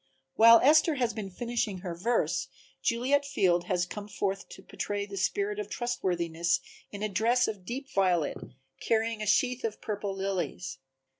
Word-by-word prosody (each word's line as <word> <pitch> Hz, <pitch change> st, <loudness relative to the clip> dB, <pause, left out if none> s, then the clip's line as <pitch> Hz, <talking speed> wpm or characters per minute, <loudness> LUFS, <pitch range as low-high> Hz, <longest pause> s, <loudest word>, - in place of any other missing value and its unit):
While 230 Hz, +1 st, +8 dB
Esther 310 Hz, +3 st, +5 dB
has 245 Hz, -4 st, 0 dB
been 210 Hz, -3 st, -5 dB
finishing 230 Hz, -2 st, -3 dB
her 180 Hz, -3 st, -4 dB
verse, 220 Hz, +8 st, 0 dB, 0.3 s
Juliet 260 Hz, +5 st, +2 dB
Field 180 Hz, -11 st, +1 dB
has 180 Hz, -2 st, 0 dB
come 205 Hz, +3 st, -7 dB
forth 195 Hz, -1 st, -3 dB
to 190 Hz, -, -12 dB
portray 205 Hz, 0 st, -3 dB
the 200 Hz, -1 st, -8 dB
spirit 405 Hz, -, -1 dB
of 415 Hz, -, -4 dB
Trustworthiness 175 Hz, -8 st, -1 dB, 0.3 s
in 205 Hz, 0 st, -6 dB
a -, -, +1 dB
dress 230 Hz, +5 st, +2 dB
of 200 Hz, -4 st, -5 dB
deep 265 Hz, +7 st, -5 dB
violet, 180 Hz, -5 st, +2 dB, 0.4 s
carrying 225 Hz, -1 st, 0 dB
a 215 Hz, -, -3 dB
sheath 250 Hz, +6 st, +2 dB
of 225 Hz, -2 st, -3 dB
purple 205 Hz, -2 st, -4 dB
lilies. 180 Hz, -6 st, -3 dB
205 Hz, 160 wpm, -29 LUFS, 185-240 Hz, 0.4 s, While